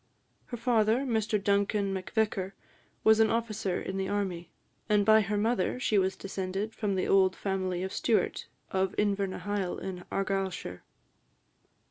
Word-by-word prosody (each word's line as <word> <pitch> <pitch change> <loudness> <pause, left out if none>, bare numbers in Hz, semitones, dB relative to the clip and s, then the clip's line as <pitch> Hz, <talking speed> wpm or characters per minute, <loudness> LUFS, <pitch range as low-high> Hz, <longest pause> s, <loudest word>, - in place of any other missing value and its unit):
Her 240 - -5
father, 230 0 +2
Mr 225 -5 0
Duncan 200 0 +1
Macvicar, 195 0 -1 0.5
was 220 0 +6
an 220 - +5
officer 215 -5 -1
in 190 - -4
the 190 0 -1
army, 185 -4 -2 0.4
and, 205 -1 +3
by 220 0 +7
her 205 0 -1
mother, 225 +2 0
she 215 -5 +2
was 190 0 +1
descended 195 +2 -4
from 205 -3 -1
the 185 - 0
old 190 -1 +4
family 185 -2 -2
of 190 - -4
Stewart, 225 -3 0 0.2
of 190 0 0
Invernahyle, 200 -1 -1
in 185 -2 -6
Argyllshire. 195 - -2
200 Hz, 140 wpm, -29 LUFS, 190-215 Hz, 0.5 s, by